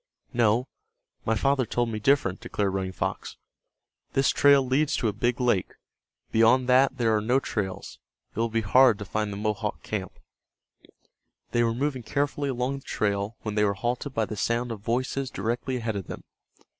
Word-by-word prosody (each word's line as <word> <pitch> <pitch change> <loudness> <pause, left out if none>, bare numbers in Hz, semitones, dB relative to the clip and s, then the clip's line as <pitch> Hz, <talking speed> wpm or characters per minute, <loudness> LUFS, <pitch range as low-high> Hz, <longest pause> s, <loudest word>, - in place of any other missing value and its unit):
"No, 120 +1 +2 0.6
my 110 - +2
father 135 +3 +2
told 120 -1 0
me 110 -1 -3
different," 105 -6 +2
declared 100 -2 -2
Running 95 -1 -2
Fox. 95 - -4 0.8
"This 135 - +3
trail 140 -1 +5
leads 140 +4 +1
to 120 - 0
a 105 - 0
big 120 +4 0
lake. 120 -7 +1 0.6
Beyond 115 +3 +4
that 130 +1 +4
there 115 -3 +2
are 105 - +1
no 125 +5 +2
trails. 100 -7 -4 0.4
It - - -4
will 115 0 +1
be 115 0 0
hard 120 +2 +5
to 105 - -7
find 105 +2 -2
the 100 - -5
Mohawk 105 -1 -2
camp." - - -5 1.3
They 120 - +2
were 115 -1 +1
moving 135 0 -1
carefully 145 +4 -1
along 130 +2 -2
the - - -20
trail 100 +1 -1
when 105 - -3
they 105 0 +2
were 100 -1 +1
halted 125 +5 -3
by 110 - +1
the 110 - -6
sound 115 +3 -1
of 110 - -5
voices 130 +4 -2
directly 120 +3 -2
ahead 115 -3 -3
of 100 -3 -5
them. - - -7
115 Hz, 180 wpm, -26 LUFS, 105-130 Hz, 1.3 s, trail